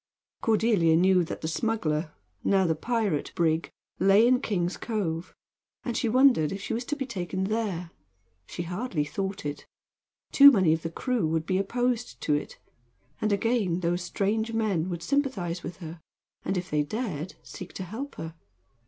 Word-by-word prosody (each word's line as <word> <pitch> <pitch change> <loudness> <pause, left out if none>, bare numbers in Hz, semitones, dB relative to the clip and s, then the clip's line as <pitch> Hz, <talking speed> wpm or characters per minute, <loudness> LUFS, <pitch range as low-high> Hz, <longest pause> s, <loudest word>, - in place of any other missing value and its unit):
Cordelia 215 -8 +3
knew 185 +1 +4
that 165 - -6
the 160 - -2
smuggler 160 -4 -1 0.3
now 195 -1 +3
the 165 - +2
pirate 205 -2 -1
brig 165 -2 +1 0.3
lay 195 +4 +6
in 250 +1 +4
King's 180 -6 -1
Cove, 180 -7 -3 0.5
and 240 - -2
she 235 - 0
wondered 250 - +4
if 195 - -4
she 200 - -4
was 235 +2 -2
to 295 - -2
be 275 -2 -3
taken 190 -5 -3
there. 195 -5 -2 0.6
She 175 - -5
hardly 180 -2 -2
thought 195 +3 -4
it. 145 0 -5 0.6
Too 280 0 +10
many 185 - +4
of 160 - -1
the 165 - -3
crew 230 +1 -1
would 160 0 0
be 185 +2 +1
opposed 245 +3 -1
to 150 - +1
it; 145 - -2 0.6
and, 215 - +1
again, 200 -4 +1
those 175 +1 0
strange 215 +5 -1
men 200 -6 0
would 170 -2 -4
sympathize 195 -9 -1
with 175 -1 -7
her, 165 -2 -9 0.4
and, 190 - -1
if 180 +1 -4
they 150 0 +2
dared, 180 - -4
seek 185 - -9
to 190 - -5
help 230 +10 -6
her. 160 0 -6
190 Hz, 170 wpm, -27 LUFS, 165-225 Hz, 0.6 s, Too